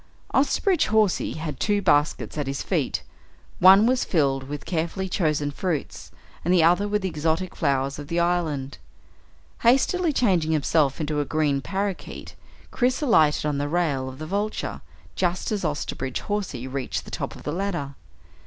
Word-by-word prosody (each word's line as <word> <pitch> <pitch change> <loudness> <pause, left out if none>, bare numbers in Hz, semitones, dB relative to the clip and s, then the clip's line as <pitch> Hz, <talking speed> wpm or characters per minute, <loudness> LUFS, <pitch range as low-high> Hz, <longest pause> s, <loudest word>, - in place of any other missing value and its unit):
Osterbridge 325 +5 +2
Hawsey 215 -3 +2
had 160 -1 -5
two 205 -1 +1
baskets 145 -5 +1
at 145 -3 -2
his 135 0 -3
feet. - - -1 0.6
One 190 +4 +8
was 250 +1 +2
filled 135 -5 0
with 145 -1 -6
carefully 170 +3 -2
chosen 150 -5 0
fruits, 165 0 -4 0.3
and 175 - +1
the 180 -3 +5
other 175 +5 +4
with 210 -1 -1
the - - +1
exotic 165 +2 -1
flowers 140 -2 0
of 145 - -8
the 170 +2 -1
island. 160 -6 -1 0.8
Hastily 305 +8 +3
changing 180 - +2
himself 150 -2 +2
into 150 -1 -1
a 145 - 0
green 145 -2 0
parakeet, 195 +3 -4 0.4
Chris 255 0 +1
alighted 155 - +3
on 145 -2 0
the 145 0 -2
rail 145 -6 0
of 130 - -10
the 155 - -6
Vulture 205 +5 -3 0.3
just 180 +2 -1
as 210 -3 -1
Osterbridge 145 -4 -3
Hawsey 190 - -3
reached 135 0 -3
the - - -11
top - - -4
of - - -12
the 150 - -3
ladder. 170 -7 -3
165 Hz, 165 wpm, -24 LUFS, 145-200 Hz, 0.8 s, One